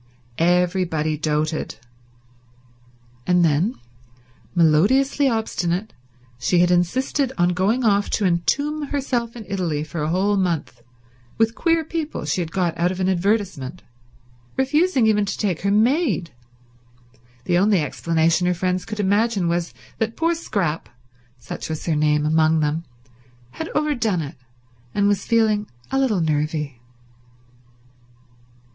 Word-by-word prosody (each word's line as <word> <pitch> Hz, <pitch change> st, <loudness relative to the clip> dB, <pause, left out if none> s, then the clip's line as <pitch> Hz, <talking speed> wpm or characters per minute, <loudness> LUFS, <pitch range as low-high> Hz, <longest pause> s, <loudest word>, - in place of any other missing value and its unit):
Everybody 175 Hz, -2 st, +1 dB
doted. 155 Hz, +1 st, -1 dB, 1.5 s
And 180 Hz, -1 st, +4 dB
when, 165 Hz, -, +2 dB, 0.8 s
melodiously 220 Hz, -, +3 dB
obstinate, 215 Hz, -4 st, -2 dB, 0.5 s
she 175 Hz, +7 st, +1 dB
had 175 Hz, +1 st, +4 dB
insisted 255 Hz, -, +1 dB
on 175 Hz, -1 st, +3 dB
going 200 Hz, +8 st, +1 dB
off 200 Hz, -1 st, +2 dB
to 210 Hz, -, -1 dB
entomb 285 Hz, -, 0 dB
herself 250 Hz, -5 st, -2 dB
in 225 Hz, -3 st, -8 dB
Italy 175 Hz, -7 st, -2 dB
for 155 Hz, +1 st, -5 dB
a 150 Hz, -, -1 dB
whole 195 Hz, +4 st, +1 dB
month 170 Hz, -9 st, -2 dB, 0.6 s
with 225 Hz, 0 st, +2 dB
queer 330 Hz, +2 st, +1 dB
people 315 Hz, -, -4 dB
she 155 Hz, +5 st, 0 dB
had 165 Hz, -2 st, -4 dB
got 175 Hz, -3 st, 0 dB
out 175 Hz, +1 st, +2 dB
of 185 Hz, -, -5 dB
an 185 Hz, -, +1 dB
advertisement, 185 Hz, -, -1 dB, 0.7 s
refusing 275 Hz, 0 st, +2 dB
even 210 Hz, -1 st, +3 dB
to 200 Hz, -, -3 dB
take 190 Hz, -6 st, -1 dB
her 200 Hz, -, 0 dB
maid, 220 Hz, -, +2 dB, 1.1 s
the 175 Hz, -1 st, +2 dB
only 200 Hz, 0 st, +3 dB
explanation 165 Hz, +3 st, +1 dB
her 180 Hz, -, +1 dB
friends 180 Hz, +1 st, -1 dB
could 215 Hz, -1 st, -6 dB
imagine 205 Hz, -1 st, +1 dB
was 170 Hz, 0 st, -1 dB, 0.3 s
that 225 Hz, 0 st, -2 dB
poor 330 Hz, +1 st, +2 dB
Scrap—such 125 Hz, -, -5 dB
was 160 Hz, -1 st, -4 dB
her 165 Hz, -, +1 dB
name 150 Hz, 0 st, +2 dB
among 160 Hz, +1 st, +3 dB
them—had 125 Hz, -, -6 dB
overdone 240 Hz, -, 0 dB
it 145 Hz, +1 st, -8 dB, 0.6 s
and 200 Hz, -1 st, +3 dB
was 205 Hz, -1 st, +1 dB
feeling 215 Hz, -3 st, +2 dB, 0.2 s
a 270 Hz, -, +1 dB
little 225 Hz, -9 st, +1 dB
nervy. 150 Hz, -4 st, -1 dB
180 Hz, 125 wpm, -22 LUFS, 160-220 Hz, 1.5 s, And